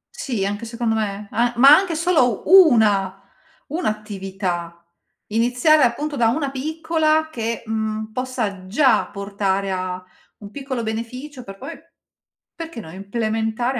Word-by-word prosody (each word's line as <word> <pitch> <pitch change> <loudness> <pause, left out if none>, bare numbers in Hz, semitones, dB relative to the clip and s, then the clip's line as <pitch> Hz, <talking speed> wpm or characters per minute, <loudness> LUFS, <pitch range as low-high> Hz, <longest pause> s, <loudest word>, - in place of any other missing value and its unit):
Sì, 230 -8 -2
anche 205 +3 -3
secondo 230 0 -2
me, 205 -1 -3
a 240 +1 +1
ma 270 +3 +8
anche 370 -1 0
solo 310 - +2
una 220 - +5 0.5
1 315 -2 -1
attività. 190 -5 -4 0.5
Iniziare 245 +8 +3
appunto 285 +4 0
da 240 -4 +2
una 275 +3 -1
piccola 315 +2 0
che, 230 -3 -3
mhmm, 220 0 -3
possa 225 -7 -3
già 260 +7 +3
portare 200 -1 -2
a 185 0 -3 0.4
un 205 -1 -11
piccolo 265 -3 -4
beneficio 250 +5 -6
per 195 -3 -10
poi, 265 - -7 0.8
perché 330 -7 -8
no, 160 - -9
implementare 225 +5 -2
230 Hz, 130 wpm, -21 LUFS, 200-275 Hz, 0.8 s, ma